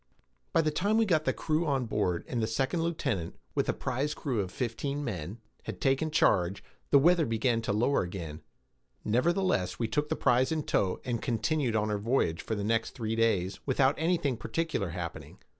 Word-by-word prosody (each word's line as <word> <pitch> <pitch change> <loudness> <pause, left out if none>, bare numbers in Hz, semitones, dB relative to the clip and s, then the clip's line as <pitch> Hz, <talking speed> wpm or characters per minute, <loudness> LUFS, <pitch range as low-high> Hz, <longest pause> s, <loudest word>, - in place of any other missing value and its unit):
By 165 - +4
the 155 -1 +1
time 200 +8 +1
we 225 - +4
got 160 -6 +2
the - - +3
crew 160 +1 -1
on 135 -3 +1
board, 95 -6 -1
and 120 -3 -2
the 110 - +1
second 135 +9 0
lieutenant, 135 - -2 0.2
with - - 0
a - - +3
prize 145 +4 -2
crew 130 -7 -2
of 95 -2 -1
fifteen 140 +6 -3
men, 95 - -4 0.3
had - - -6
taken 135 +4 +1
charge, 95 - +2 0.3
the 140 - +6
weather 170 +4 +5
began 115 +1 +1
to 110 - -2
lower 120 +7 +2
again; 85 -4 -6 0.6
nevertheless 165 - +1
we 115 - -1
took 150 +7 -1
the - - 0
prize 125 +1 +2
in 155 -1 0
tow, 95 -8 0
and 120 -3 -2
continued 125 +1 0
on 105 0 +1
our 105 - -1
voyage 105 -7 +1
for 110 - -3
the 100 - -3
next 115 +2 0
three 115 -3 -2
days, 100 -5 +1
without 135 0 +3
anything 160 -6 +1
particular 160 - -2
happening. 85 0 -6
120 Hz, 190 wpm, -30 LUFS, 105-150 Hz, 0.6 s, the